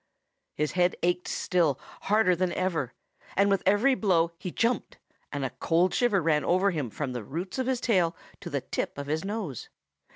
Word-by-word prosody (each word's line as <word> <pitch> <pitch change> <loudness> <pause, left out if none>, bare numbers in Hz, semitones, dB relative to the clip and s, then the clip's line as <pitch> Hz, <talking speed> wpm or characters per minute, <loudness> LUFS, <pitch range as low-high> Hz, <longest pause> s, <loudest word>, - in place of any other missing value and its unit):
His 150 -1 0
head 180 0 +2
ached 180 +1 +1
still, 165 -7 +1 0.3
harder 210 -3 +4
than 180 0 0
ever. 165 -9 -1 0.4
And 200 +1 +4
with 195 - +2
every 210 +8 +4
blow 175 -8 +2
he 185 - -4
jumped, 230 +7 -1 0.3
and 145 -2 -2
a 130 - -3
cold 175 +3 +1
shiver 210 -8 +2
ran 150 -2 +2
over 185 +3 +3
him 150 -8 -2
from 130 +3 -4
the 120 -3 -4
roots 175 - -5
of 260 - 0
his 260 -2 +1
tail 185 -9 +2 0.2
to - - -7
the - - -1
tip - - -3
of 140 - -4
his 155 +3 -1
nose. 195 - -4
180 Hz, 190 wpm, -28 LUFS, 155-200 Hz, 0.4 s, harder